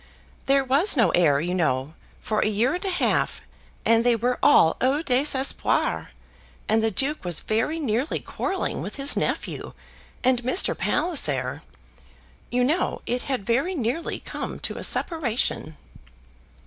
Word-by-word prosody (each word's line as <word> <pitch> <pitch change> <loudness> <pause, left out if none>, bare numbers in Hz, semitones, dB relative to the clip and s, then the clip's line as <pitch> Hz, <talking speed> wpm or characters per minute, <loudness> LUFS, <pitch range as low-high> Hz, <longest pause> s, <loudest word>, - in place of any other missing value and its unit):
"There 275 0 +4
was 280 +7 +2
no 235 - +4
heir, 150 -5 +3
you 175 +4 -2
know, 150 -5 0 0.3
for 215 -1 -1
a - - +2
year 220 +7 +1
and 360 - -4
a 390 - -1
half, 360 - 0 0.5
and 230 0 +4
they 240 -1 +4
were 245 +2 -1
all 165 - +5
au 275 +5 +2
désespoir; 270 0 +1 0.6
and 220 +1 +3
the 225 - +2
Duke 275 +8 -1
was 175 -3 -1
very 225 +9 -1
nearly 260 +1 -1
quarrelling 385 -1 -3
with - - -6
his 275 +1 +2
nephew; - - -3 0.5
and 255 -1 +3
Mr. 255 +10 +1
Palliser; 145 - 0 0.9
you 250 +1 +1
know 305 +8 0
it 245 +1 -1
had 255 -7 -2
very 275 - 0
nearly 265 +4 -2
come - - -6
to - - -4
a - - -5
separation." 245 - -1
250 Hz, 150 wpm, -24 LUFS, 215-290 Hz, 0.9 s, all